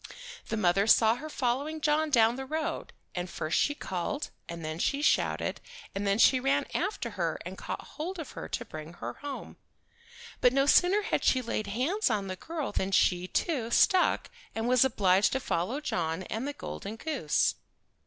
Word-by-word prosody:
The 225 - -2
mother 195 +1 +2
saw 220 0 +6
her 310 +4 -7
following 280 +4 -1
John 305 +1 +2
down 230 -4 +4
the 265 +1 -6
road, 315 +2 -3 0.2
and 180 0 -4
first 155 -1 -1
she 290 - +1
called, 190 - -4 0.2
and 170 -1 -6
then 155 +1 -4
she 280 +9 0
shouted, - - +1 0.3
and 200 +1 -2
then 200 0 +2
she 255 +3 +6
ran 275 +2 +1
after 395 +5 -2
her - - -2
and - - -6
caught - - -6
hold 350 +5 -6
of 320 -5 -7
her - - -7
to - - -3
bring 155 +1 -8
her 120 -8 -6
home. 285 -1 -7 0.8
But 250 0 +4
no 275 0 +3
sooner 365 +7 +5
had - - -1
she 255 -1 +3
laid 215 -2 -2
hands 270 - 0
on 210 -3 0
the 185 -1 -4
girl 315 - -4
than 190 +1 -1
she, 180 -1 +3
too, 255 - -1
stuck, 365 +9 +3 0.2
and 225 +1 -1
was 250 0 +5
obliged 200 -6 +3
to 265 - +1
follow 230 - -1
John 175 - -2
and 225 +8 -4
the 290 - -3
golden 210 -5 -6
goose. 260 - +1
245 Hz, 185 wpm, -29 LUFS, 195-290 Hz, 0.8 s, saw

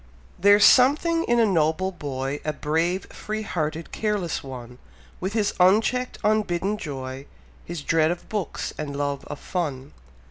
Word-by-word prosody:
There's 205 +2 +6
something 315 +6 +5
in 240 0 +2
a 230 - +5
noble 175 0 +1
boy, 140 -4 -4
A 155 - -1
brave, 165 +6 0
free 215 0 -4
hearted, 160 -4 -3
careless 210 -6 -2
one; 125 -2 -9 0.4
With 190 +3 -3
his 210 -2 +1
uncheck'd, 220 +7 +3
unbidden 210 -1 +1
joy, 135 -4 -6 0.4
His 170 -4 -6
dread 160 0 +3
of 175 +1 -4
books 210 -4 -3
and 145 -2 -4
love 140 -1 -2
of 145 - -6
fun. 145 -7 -4
175 Hz, 145 wpm, -24 LUFS, 145-210 Hz, 0.4 s, There's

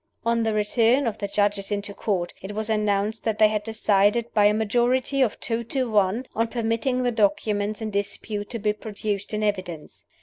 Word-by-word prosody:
On 230 0 +2
the 220 -1 0
return 230 +5 +3
of 230 - -2
the 200 - -2
Judges 205 0 0
into 200 0 -2
Court, 185 -4 -2
it 195 +2 -6
was 215 +1 -2
announced 210 0 0
that 220 -2 -1
they 215 0 +6
had 210 -1 -1
decided, 215 +1 +1
by 210 -1 +4
a 205 - +6
majority 240 +5 +1
of 240 -5 +1
two 230 0 -2
to 255 0 -1
one, 210 +4 +2
on 230 +1 +1
permitting 230 +2 -1
the 245 - +1
documents 205 0 0
in 215 - -3
dispute 205 +1 -3
to 235 - -4
be 210 -1 0
produced 210 -1 -4
in 215 0 -2
evidence. 185 -7 -3
215 Hz, 195 wpm, -24 LUFS, 205-230 Hz, -, they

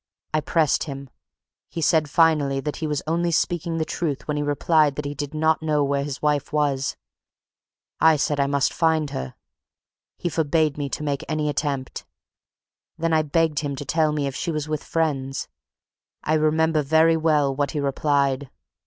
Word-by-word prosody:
I 155 - +2
pressed 155 -1 +1
him 140 -3 -8 0.6
he - - -6
said 155 -1 +2
finally 150 -4 +3
that 150 +2 -4
he 160 - -3
was 150 -2 -2
only 170 +2 0
speaking 170 0 0
the 160 - 0
truth 155 -4 -3
when 150 - -1
he 150 - -1
replied 145 0 +2
that 150 - -4
he 145 - -3
did 145 +1 -5
not 160 +1 +2
know 150 -2 +1
where 140 0 0
his 145 0 -6
wife 150 -2 +1
was. 145 -3 0 1.0
I 160 0 +6
said 145 0 0
I 140 - +2
must 140 -1 +1
find 160 -3 +1
her. 65 0 -5 0.8
He - - -3
forbade 155 -2 +1
me 145 -1 -3
to 150 - -4
make 140 -2 -2
any 155 -1 0
attempt. 140 -3 -3 0.9
Then 165 0 0
I 160 - +4
begged 155 0 +1
him 145 -2 -3
to 145 - -6
tell 155 +2 +2
me 150 -1 -1
if 135 -1 -3
she 170 - -3
was 155 -2 -2
with 155 -1 -3
friends. 135 -5 -2 0.8
I 155 - 0
remember 155 0 +2
very 160 +3 +4
well 150 -4 +2
what 145 0 0
he 150 - -3
replied. 140 -1 0
150 Hz, 180 wpm, -23 LUFS, 140-160 Hz, 1.0 s, I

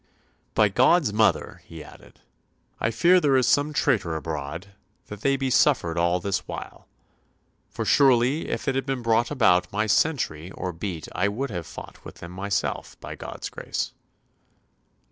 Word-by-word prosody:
"By 105 - +5
God's 130 - +3
mother," 110 +1 +1
he 80 -2 -10
added, - - -16 0.6
"I 110 - +1
fear 175 +10 +4
there 145 -5 +3
is 130 - +3
some 145 +1 +3
traitor 95 - +1
abroad, 80 +4 -5 0.4
that 105 0 -8
they 140 +2 +2
be 135 -1 -2
suffered 120 - +3
all 85 +1 +1
this 100 +2 -2
while. - - -8 0.8
For - - -4
surely 135 +2 +3
if - - -4
it 135 - +2
had 135 +1 -2
been 130 -3 -3
about 110 -6 +3
my 110 +2 0
sentry 105 - 0
[or 90 -1 -4
beat] 85 -2 -5
I - - +1
would 115 +6 -3
have 85 -4 -5
fought - - -11
with - - -10
them 85 - -10
myself, 95 +2 -3
by - - -7
God's - - -7
grace." - - -4
105 Hz, 160 wpm, -25 LUFS, 90-135 Hz, 0.8 s, By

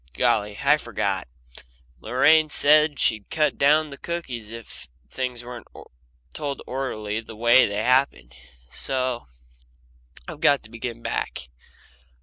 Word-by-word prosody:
Golly, 105 -1 +1
I - - +5
forgot. - - -3 0.7
Lorraine 155 - +4
said 150 0 +4
she'd 110 -2 +1
cut 155 -1 0
down 150 +2 +3
the 140 - -10
cookies 130 -11 -5
if 115 - -10 0.2
things 125 -2 -4
weren't 120 0 -9 0.7
told 145 -2 -4
orderly 110 -5 -3
the 110 -1 -12
way 120 +3 +5
they 105 +1 -3
happened. 125 - +1 0.4
So 130 - -2 1.0
I've - - -9
got 140 -2 +4
to 110 - -13
begin 115 0 -6
back. 65 0 -4
125 Hz, 125 wpm, -24 LUFS, 110-145 Hz, 1.0 s, I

